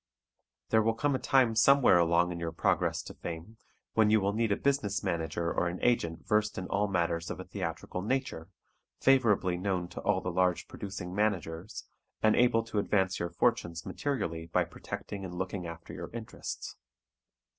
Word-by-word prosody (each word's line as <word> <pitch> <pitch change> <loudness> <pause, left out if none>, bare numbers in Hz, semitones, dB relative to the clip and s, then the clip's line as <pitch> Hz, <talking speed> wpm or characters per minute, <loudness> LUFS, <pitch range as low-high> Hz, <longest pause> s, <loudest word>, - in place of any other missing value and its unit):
There 110 - +4
will 115 +1 +1
come 145 +5 +1
a 130 - 0
time 130 -5 +3
somewhere 125 -4 +6
along 85 +1 +3
in 85 - -5
your 85 -1 -3
progress 80 - +1
to - - -9
fame 85 +6 -7 0.4
when 110 -1 +4
you 110 0 +5
will 100 0 0
need 115 0 +1
a 100 - +2
business 135 -8 0
manager 85 0 -1
or 90 - +1
an 85 +1 -3
agent 85 -9 +1
versed 105 -1 +1
in 95 - -3
all 100 +1 +1
matters 85 -3 0
of - - -5
a - - -5
theatrical 90 - -4
nature, 105 - -2 0.5
favorably 110 -9 +3
known 90 -1 -1
to - - -7
all 100 -2 +2
the 90 -1 -3
large 90 0 +1
producing 95 -3 -6
managers, 95 -3 -2 0.4
and 110 0 +5
able 120 -2 +4
to 110 -2 -2
advance 95 -2 +1
your 85 - -2
fortunes 85 -7 0
materially 85 - -3
by 80 - +2
protecting 100 -1 -7
and 90 -2 -6
looking 95 0 -3
after 85 0 -9
your - - -6
interests. 115 -2 -6
95 Hz, 175 wpm, -30 LUFS, 85-110 Hz, 0.5 s, somewhere